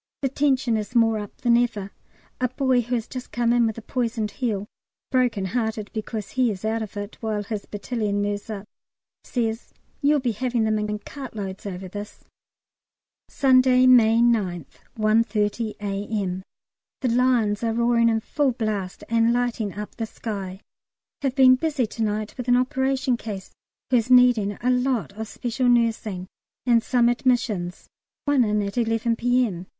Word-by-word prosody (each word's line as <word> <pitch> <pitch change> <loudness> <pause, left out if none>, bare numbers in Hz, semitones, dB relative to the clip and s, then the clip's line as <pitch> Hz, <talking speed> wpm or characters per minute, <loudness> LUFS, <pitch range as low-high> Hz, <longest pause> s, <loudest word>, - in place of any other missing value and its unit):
The 270 - +2
tension 265 -4 +1
is 215 +3 -5
more 225 -2 +4
up 205 -1 -9
than 240 -1 +4
ever. 230 -5 0 0.5
A 255 - +2
boy 255 -1 +2
who 240 +2 -2
has 230 -1 -3
just 255 -1 -7
come 235 0 +1
in 240 -1 +4
with 220 - -4
a 230 - -8
poisoned 230 -3 -2
heel 205 -2 -2 0.5
(broken 245 -6 +1
hearted 220 0 -2
because 215 -1 -5
he 255 -2 +2
is 205 -1 -5
out 225 +1 0
of 210 -1 -6
it, 205 +1 -6
while 215 -2 -2
his 205 0 -5
battalion 210 -1 -2
moves 205 +2 -2
up) 205 -2 -5 0.6
says, 225 -1 -3 0.3
"You'll 295 0 +4
be 250 -3 0
having 240 +1 -1
them 215 -1 +1
in 210 0 -2
in 210 - -2
cartloads 210 -6 -7
over 190 -1 -6
this." 205 +2 -8 1.1
Sunday, 255 -2 +4
May 230 -3 +6
9th, 195 - 0 0.2
1.30 215 0 +1
A.M. 200 -2 -3 0.6
The 255 - +1
Lions 235 -3 +2
are 230 - +1
roaring 235 0 +3
in 225 -1 +1
full 275 +2 0
blast 210 -5 -3
and 230 0 +3
lighting 240 -4 0
up 210 0 -7
the 225 -1 -3
sky. 195 -4 -6 0.6
Have 270 -2 -1
been 260 -2 +7
busy 280 -1 0
to 225 +1 -7
night 215 0 -2
with 250 -1 -5
an 245 0 +5
operation 265 0 +1
case 205 -5 -7 0.4
who 250 - +5
is 235 +1 -1
needing 245 -5 +5
a 250 - +3
lot 250 -3 0
of 220 +2 -6
special 245 +3 -1
nursing, 225 -6 +1 0.4
and 235 -2 +4
some 240 0 +2
admissions 235 -7 0 0.4
one 285 -3 +4
in 210 -1 +1
at 200 +4 -2
11 225 0 +1
P.M. 235 -8 0
230 Hz, 165 wpm, -24 LUFS, 210-250 Hz, 1.1 s, been